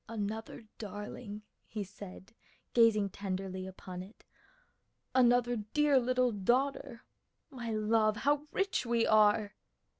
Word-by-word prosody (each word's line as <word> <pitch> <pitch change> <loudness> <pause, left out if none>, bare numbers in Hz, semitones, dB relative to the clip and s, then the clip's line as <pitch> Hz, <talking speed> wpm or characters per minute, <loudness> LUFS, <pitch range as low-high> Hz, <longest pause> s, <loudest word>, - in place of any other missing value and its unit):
"Another 220 +1 -4 0.2
darling," 210 0 -7 0.2
he 215 -2 -4
said 195 +1 -11 0.4
gazing 215 -4 +4
tenderly 190 -1 -4
upon 185 -1 -8
it, 195 +4 -13 0.9
"another 245 -1 +4
dear 280 +6 +2
little 250 0 +2
daughter! 240 +4 0 0.5
My 240 -4 -6
love, 215 0 +2
how 290 +4 +1
rich 390 0 0
we 235 -1 +1
are!" 210 -1 +4
220 Hz, 110 wpm, -32 LUFS, 205-245 Hz, 0.9 s, gazing